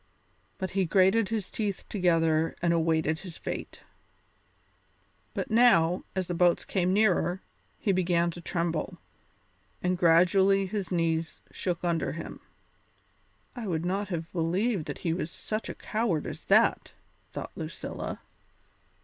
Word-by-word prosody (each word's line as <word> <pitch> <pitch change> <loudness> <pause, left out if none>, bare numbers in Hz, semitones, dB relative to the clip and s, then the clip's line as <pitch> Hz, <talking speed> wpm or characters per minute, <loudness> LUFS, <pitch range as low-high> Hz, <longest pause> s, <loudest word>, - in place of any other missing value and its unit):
But 190 - -3
he 195 -1 +1
grated 190 +4 +3
his 215 -4 -3
teeth 205 -3 -3
together 165 -4 +2
and 170 -1 +2
awaited 160 -1 +1
his 180 -4 -9
fate. - - -6 1.5
But - - -3
now, 185 -7 +4
as 190 -1 0
the 175 - -3
boats 175 0 +3
came 185 -2 0
nearer, 190 -3 +2 0.4
he 205 - 0
began 175 -2 +2
to 175 - -9
tremble, 170 -1 -2 0.8
and 180 0 0
gradually 190 +3 +5
his 195 0 -4
knees 165 -2 -1
shook 175 -2 -3
under 170 -2 0
him. 165 - -7 1.2
"I 240 -4 -5
would 165 -2 -1
not 195 +3 -1
have 170 -3 -4
believed 180 +3 0
that - - -5
he 165 - +2
was 170 -1 -3
such 215 +5 -4
a - - -5
coward 215 -9 -1
as - - -7
that," - - +3 0.4
thought - - -6
Lucilla. - - -6
180 Hz, 135 wpm, -28 LUFS, 165-195 Hz, 1.5 s, gradually